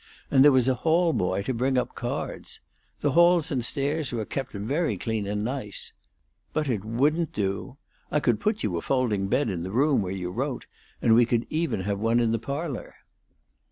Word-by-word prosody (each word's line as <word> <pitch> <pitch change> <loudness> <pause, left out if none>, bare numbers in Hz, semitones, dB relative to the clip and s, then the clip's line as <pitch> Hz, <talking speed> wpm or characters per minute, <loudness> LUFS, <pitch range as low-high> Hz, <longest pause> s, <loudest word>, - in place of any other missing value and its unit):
And 135 -2 +6
there 145 - +8
was 130 -2 +3
a 130 - +4
hall 165 +6 +2
boy 95 -3 0
to 130 - -2
bring 130 +2 +1
up 125 - -1
cards. - - -5 0.4
The 145 - +2
halls 170 0 +4
and 130 -4 0
stairs 145 +3 0
were 115 -3 -2
kept 135 +3 -4
very 115 - -1
clean 110 0 -2
and 105 +1 -2
nice. 125 -5 -5 0.6
But 155 -1 0
it 110 -7 -1
wouldn't 145 +9 +1
do. 100 +6 -3 0.3
I 150 - +1
could 120 -6 +1
put 215 0 -1
you 90 -4 -1
a - - -2
folding 115 -7 0
bed 140 +7 +1
in 90 -5 -2
the 90 - -4
room 135 +6 +2
where 95 -2 -3
you 90 -2 -4
wrote, - - -3 0.4
and 115 - +5
we 120 0 +5
could 120 0 +1
even 155 - 0
have 100 +1 -2
one 115 +2 +2
in 115 -2 +2
the 115 - 0
parlor." 140 +2 -5
125 Hz, 200 wpm, -26 LUFS, 105-145 Hz, 0.6 s, there